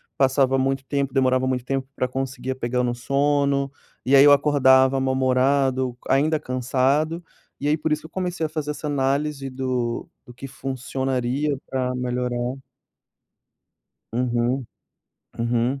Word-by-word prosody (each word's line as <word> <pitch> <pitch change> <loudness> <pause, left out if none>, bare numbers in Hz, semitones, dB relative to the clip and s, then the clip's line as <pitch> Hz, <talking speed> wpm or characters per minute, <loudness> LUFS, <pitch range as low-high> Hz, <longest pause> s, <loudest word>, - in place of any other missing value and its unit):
passava 135 0 +3
muito 135 0 -1
tempo, 140 -1 -2
demorava 130 -1 +2
muito 125 -1 -1
tempo 135 0 -2
pra 130 - 0
conseguir 130 0 -3
pegar 125 0 -1
o - - 0
meu 120 -1 0
sono. 140 +2 +1 0.3
E 135 - +4
aí 135 - +8
eu 145 - +8
acordava 135 -2 +5
mal-humorado, 130 -1 +1
ainda 150 +4 +2
cansado, 135 +5 0 0.4
e 145 - -2
aí 150 - +3
por 160 - -2
isso 150 0 +1
que - - -12
eu - - -10
comecei 180 -3 -2
a - - -3
fazer 155 -1 -4
essa 150 +1 -7
análise 140 0 -1
do 125 -2 -2 0.2
do 125 - -13
que 130 +3 -8
funcionaria 135 +1 -2
pra 130 -1 -2
melhorar. 125 0 -2 1.6
Uhum, 120 +1 0 0.7
uhum. 120 +3 0
130 Hz, 145 wpm, -23 LUFS, 125-140 Hz, 1.6 s, aí